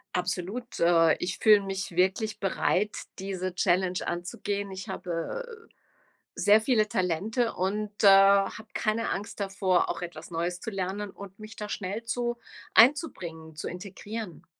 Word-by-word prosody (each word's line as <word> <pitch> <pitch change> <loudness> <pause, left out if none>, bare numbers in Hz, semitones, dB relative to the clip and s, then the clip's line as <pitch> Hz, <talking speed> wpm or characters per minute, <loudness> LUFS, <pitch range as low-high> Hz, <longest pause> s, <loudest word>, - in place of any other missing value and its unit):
Absolut, 185 +7 -3
äh, 165 -1 +5
ich 185 - -2
fühle 210 -2 +6
mich 195 -1 -4
wirklich 190 +4 +1
bereit, 200 +1 0 0.2
diese 185 -1 -3
Challenge 180 0 +1
anzugehen. 195 +3 -3
Ich 190 +2 -7
habe, 180 - -4 0.3
äh, - - -28 0.6
sehr 210 +2 +5
viele 220 -3 +2
Talente 200 +6 0
und, 205 +3 -2
äh, - - +8
habe 195 +2 +5
keine 220 +1 0
Angst 205 +1 -5
davor, 195 -2 +1
auch - - -3
etwas 170 -1 -8
Neues 175 +2 -2
zu 225 - -5
lernen 195 +1 -3
und 195 -1 -11
mich 215 0 -10
da 210 -1 -5
schnell 200 +4 -4
zu 240 0 -1 0.4
einzubringen, 180 - +3
zu 155 - -5
integrieren. 200 +1 -7
195 Hz, 145 wpm, -28 LUFS, 180-215 Hz, 0.6 s, äh